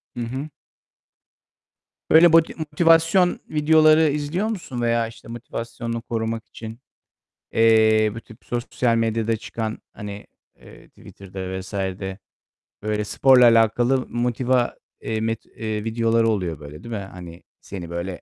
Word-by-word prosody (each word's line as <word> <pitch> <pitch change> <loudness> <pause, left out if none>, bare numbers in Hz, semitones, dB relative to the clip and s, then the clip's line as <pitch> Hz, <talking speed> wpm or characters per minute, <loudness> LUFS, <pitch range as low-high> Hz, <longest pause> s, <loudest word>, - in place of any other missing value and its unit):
Hı 120 - -4
hı. 130 +6 -5 1.6
Böyle 165 +1 +7
boti 165 -1 +5
motivasyon 165 +3 +3
videoları 155 0 +4
izliyor 150 +8 -2
musun 170 - -5
veya 115 -1 +1
işte 115 0 -14
motivasyonunu 115 0 -6
korumak 115 -1 -3
için, 110 +1 -9 0.7
eee, 110 -1 +4
bu 115 - -7
tip 115 +1 -17
sosyal 120 0 -1
medyada 115 0 0
çıkan, 110 0 -5
hani, 105 -1 -8 0.3
eee, - - -16
Twitter'da 95 -1 -8
vs. 95 +2 -10
de 95 0 -4 0.6
böyle 105 0 -1
sporla 125 +3 +5
alakalı 120 +3 +3
motiva 120 +1 0 0.3
eee, 110 -1 -3
met 115 0 -2
eee, 110 -1 -5
videoları 115 0 +1
oluyor 90 -8 -2
böyle 75 +2 -11
değil 115 -1 -5
mi? 100 - -4
Hani 85 -2 -11 0.2
seni 90 -4 -8
böyle 85 +2 -5
115 Hz, 130 wpm, -22 LUFS, 105-130 Hz, 1.6 s, Böyle